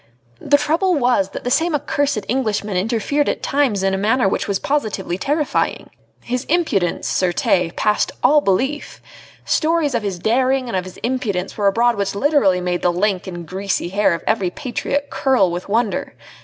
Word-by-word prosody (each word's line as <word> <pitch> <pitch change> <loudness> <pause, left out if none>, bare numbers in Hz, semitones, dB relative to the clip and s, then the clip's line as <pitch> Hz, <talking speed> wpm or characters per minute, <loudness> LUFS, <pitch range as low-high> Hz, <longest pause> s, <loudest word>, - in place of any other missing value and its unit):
The 285 - +3
trouble 335 +5 +1
was, 245 -8 +2
that - - -7
that 245 - -2
same 325 +3 +2
accursed 285 -5 -1
Englishman 215 -5 -1
interfered 230 +9 0
at - - -3
times 265 -9 +1
in 195 0 +1
a 190 - -1
manner 225 +3 +2
which - - -1
was 200 -2 0
positively 215 -10 -2
terrifying. 295 +4 -1 0.3
His 250 +1 -2
impudence, 290 - 0
certes, 180 -1 +1
passed 210 0 +1
all 295 +4 +5
belief. 265 +8 -1 0.5
Stories 315 -3 +1
of 235 - 0
his 200 -3 -3
daring 255 +6 +1
and 235 - -3
of 185 -1 -1
his 185 - -10
impudence 220 -7 -2
were 205 -2 +1
abroad 235 +3 +2
which 200 0 -2
literally 205 -7 +3
made 180 0 -1
the 175 - +2
lank 190 +1 -1
and 175 -2 -7
greasy 190 -1 -2
hair 195 -2 +2
of 165 - -8
every 200 -5 +1
patriot 280 +6 -3
curl 250 -10 +2
with 175 +3 -5
wonder. 235 +5 -1
220 Hz, 175 wpm, -19 LUFS, 190-275 Hz, 0.5 s, all